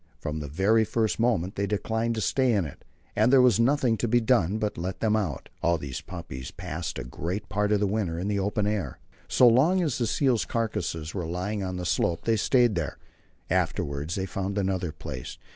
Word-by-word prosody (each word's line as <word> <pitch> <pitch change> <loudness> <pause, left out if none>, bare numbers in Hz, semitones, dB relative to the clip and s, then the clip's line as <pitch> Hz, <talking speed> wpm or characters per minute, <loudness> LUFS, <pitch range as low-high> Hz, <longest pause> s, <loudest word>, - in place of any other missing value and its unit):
From 75 +1 -4
the 75 - -5
very 100 +10 +3
first 110 0 0
moment 105 -6 +1
they 100 0 -1
declined 110 +3 -1
to 110 - -2
stay 125 +6 +2
in 100 -5 +1
it, 75 - -10 0.3
and 110 +3 +4
there 135 - +7
was 125 -5 +5
nothing 125 -1 +3
to 120 - -1
be 120 +2 +4
done 110 -5 +2
but 105 -1 -1
to - - -7
let 95 +2 -4
them 110 -1 +2
out. 95 -11 -2
All 85 0 +2
these 70 -4 -5
puppies 80 -8 -7
passed 80 +2 -5
a 65 - -4
great 85 - -4
part 105 +1 0
of 105 - +3
the 105 - +2
winter 95 -5 -1
in 90 +3 -3
the 100 -1 0
open 100 +1 0
air. 100 - -2 0.3
So 125 - +5
long 155 +11 +4
as 145 -7 -1
the 120 - +1
seals' 130 -1 +2
carcasses 105 -9 -2
were 90 -4 -3
lying 95 +5 -3
on 95 -1 -3
the 90 - -4
slope, 85 0 0
they 115 - +3
stayed 120 +1 +3
there; 85 -5 -3 0.5
afterwards 70 +3 -1
they 95 - -2
found 100 +1 -3
another 95 -4 -1
place. 65 -4 -7
100 Hz, 215 wpm, -27 LUFS, 85-115 Hz, 0.5 s, there